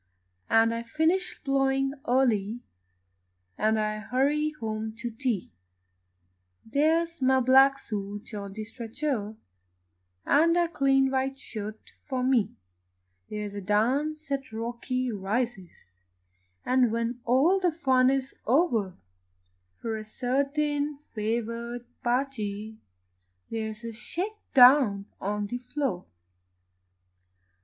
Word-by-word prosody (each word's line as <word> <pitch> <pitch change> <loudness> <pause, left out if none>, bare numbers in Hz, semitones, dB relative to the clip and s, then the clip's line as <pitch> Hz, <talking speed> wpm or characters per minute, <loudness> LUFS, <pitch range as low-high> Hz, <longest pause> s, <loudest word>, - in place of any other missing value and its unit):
And 225 0 +4
I 230 - -2
finish 320 +10 0
ploughing 270 -1 +1
early, 240 -3 +2 0.9
And 220 +1 +2
I 215 0 -1
hurry 275 +7 +1
home 220 -4 -4
to 235 +1 -5
tea 225 - -2 1.1
There's 325 +6 +1
my 260 0 +4
black 265 +2 +6
suit 205 -3 -6
on 200 -2 -6
the 215 +1 -5
stretcher, 225 0 -4 0.9
And 335 +4 +4
a 345 -1 +2
clean 270 -3 +3
white 265 0 0
shirt 215 -4 -8
for 260 -3 -3
me; 255 -5 +2 0.7
There's 210 -1 -4
a 205 - -5
dance 275 +10 0
at 275 -3 -2
Rocky 240 +3 -3
Rises, 195 - -4 0.6
And, 250 -2 +3
when 230 +2 -2
all 280 +11 +4
the 360 -2 +2
fun 260 -5 +3
is 270 0 -1
o'er, 230 - +2 0.8
For 225 -1 -3
a 215 - -6
certain 280 +5 -1 0.2
favoured 235 +2 -3 0.2
party 220 -4 -2 0.7
There's 220 0 -4
a 230 -1 -5
shake 375 - -5 0.2
down 245 -6 +7 0.2
on 205 +1 -1
the 245 +4 -4
floor. 250 -7 -3
245 Hz, 110 wpm, -27 LUFS, 220-275 Hz, 1.1 s, down